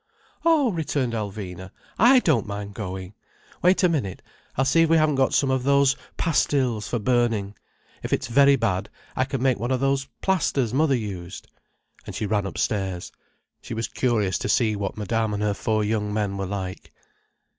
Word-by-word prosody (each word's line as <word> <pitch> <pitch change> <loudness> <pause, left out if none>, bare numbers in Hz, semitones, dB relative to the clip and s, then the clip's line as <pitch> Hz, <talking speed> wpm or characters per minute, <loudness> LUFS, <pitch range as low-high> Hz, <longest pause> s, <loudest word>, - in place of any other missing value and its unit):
"Oh!" 310 -7 +4
returned 145 -7 -1
Alvina. 95 -4 -5 0.3
"I 245 +5 +7
don't 140 - +1
mind 100 0 -5
going. 95 -1 -6 0.5
Wait 185 +2 +3
a - - +7
minute, 135 - -2 0.3
I'll 135 - +2
see 165 +5 +4
if 165 - +3
we 165 - +5
haven't 155 -1 +3
got 135 -1 +2
some 135 -2 +2
of 130 -1 +1
those 140 0 +4 0.2
pastilles 130 -8 +1
for 120 - -1
burning. 115 -3 +1 0.5
If - - -5
it's - - 0
very 140 +3 +5
bad, 100 -6 -1 0.3
I 130 - +1
can 135 -2 -3
make 130 -5 +2
one 120 +3 -2
of 130 -1 +1
those 135 0 +1 0.2
plasters 140 - +1
mother 140 0 +3
used." 95 -5 -7 0.6
And - - -6
she - - -2
ran 105 -1 0
upstairs. 95 -2 -2 0.5
She 115 - -6
was 115 +1 -2
curious 105 -8 0
to - - -3
see 110 -4 +2
what 100 0 -4
Madame 110 0 -1
and 105 - -2
her 105 -1 +1
four 110 +1 0
young 105 -1 -1
men 105 -2 -1
were 95 -1 -3
like. 95 -1 -5
115 Hz, 180 wpm, -24 LUFS, 100-135 Hz, 0.6 s, I